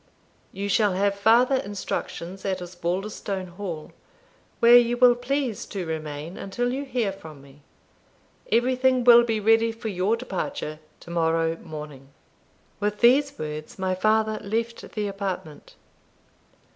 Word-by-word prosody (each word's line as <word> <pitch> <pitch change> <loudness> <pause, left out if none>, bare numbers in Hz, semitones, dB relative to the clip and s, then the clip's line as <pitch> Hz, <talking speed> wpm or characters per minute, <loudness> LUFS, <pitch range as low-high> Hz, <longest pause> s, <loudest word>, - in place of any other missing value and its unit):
You 200 +1 -4
shall 205 0 +2
have 200 +2 +1
farther 230 +6 +4
instructions 195 -3 -5
at 190 -1 -1
Osbaldistone 185 +2 -4
Hall, 175 -4 -7 0.7
where 235 +1 +7
you 240 0 +5
will 250 0 +7
please 250 -1 -2
to 190 -3 -5
remain 155 +1 -5
until 245 +6 -2
you 275 +2 -3
hear 240 -6 -1
from 160 -7 -11
me. 140 +1 -18 0.9
Everything 255 +2 +2
will 240 0 +8
be 225 -2 -1
ready 225 +2 +3
for 225 0 -6
your 195 +4 0
departure 250 - -4 0.2
to 170 - -11
morrow 165 -1 +1
morning." 150 -5 -9 0.7
With 210 0 -2
these 275 +4 +4
words 155 0 -6
my 190 -1 -1
father 215 +3 +1
left 230 +3 -3
the 210 -1 -2
apartment. 195 -6 -6
200 Hz, 135 wpm, -25 LUFS, 175-235 Hz, 0.9 s, will